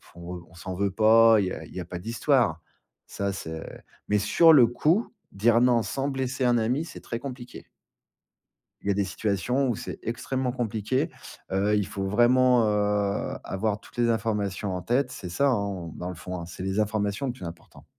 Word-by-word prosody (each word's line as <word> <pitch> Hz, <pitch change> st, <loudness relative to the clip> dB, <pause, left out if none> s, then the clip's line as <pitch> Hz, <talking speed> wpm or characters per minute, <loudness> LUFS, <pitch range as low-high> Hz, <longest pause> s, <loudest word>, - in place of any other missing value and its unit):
on, 85 Hz, +1 st, -7 dB
heu, -, -, -10 dB
on -, -, -21 dB
s'en 90 Hz, +2 st, -6 dB
veut 100 Hz, +1 st, 0 dB
pas, 110 Hz, +2 st, +6 dB
il 100 Hz, -, +1 dB
y -, -, -3 dB
a -, -, -7 dB
il -, -, -14 dB
y -, -, -4 dB
a 85 Hz, -, -7 dB
pas 90 Hz, 0 st, -6 dB
d'histoire. 115 Hz, -, +1 dB, 0.5 s
Ça 100 Hz, 0 st, -2 dB
c'est 80 Hz, -4 st, -6 dB, 0.5 s
mais 105 Hz, -, +3 dB
sur 135 Hz, +11 st, +5 dB
le 130 Hz, -6 st, +7 dB
coup, 160 Hz, -, +1 dB, 0.2 s
dire 115 Hz, +4 st, +3 dB
non 125 Hz, -2 st, +4 dB
sans 135 Hz, +4 st, -2 dB
blesser 130 Hz, -1 st, -2 dB
un 120 Hz, -1 st, +4 dB
ami, 120 Hz, +7 st, 0 dB
c'est -, -, -10 dB
très 115 Hz, -, -5 dB
compliqué. 125 Hz, -2 st, -9 dB, 1.1 s
Il -, -, -9 dB
y -, -, +3 dB
a -, -, +3 dB
des 100 Hz, +1 st, +1 dB
situations 110 Hz, +8 st, 0 dB
où 120 Hz, -, 0 dB
c'est -, -, -7 dB
extrêmement 125 Hz, +2 st, -2 dB
compliqué. 120 Hz, 0 st, -1 dB, 0.4 s
Heu, 100 Hz, +2 st, +2 dB
il 105 Hz, -2 st, +1 dB
faut 100 Hz, -1 st, -4 dB
vraiment, 120 Hz, +3 st, +4 dB
heu, 105 Hz, -1 st, 0 dB
avoir 105 Hz, +2 st, -2 dB
toutes 120 Hz, -, -18 dB
les 120 Hz, -1 st, +2 dB
informations 105 Hz, -3 st, -1 dB
en 90 Hz, -, -4 dB
tête, 125 Hz, +5 st, 0 dB
c'est 90 Hz, -, -7 dB
ça 140 Hz, +11 st, +2 dB
hein, 100 Hz, -7 st, -2 dB
dans 90 Hz, -, -5 dB
le 90 Hz, -, -6 dB
fond 90 Hz, +1 st, -6 dB
hein, 85 Hz, -, -6 dB
c'est 85 Hz, +2 st, -8 dB
les 95 Hz, +2 st, -1 dB
informations 105 Hz, +3 st, -1 dB
le 125 Hz, -, -2 dB
plus 120 Hz, -, -9 dB
important. 85 Hz, 0 st, -11 dB
105 Hz, 205 wpm, -26 LUFS, 95-125 Hz, 1.1 s, le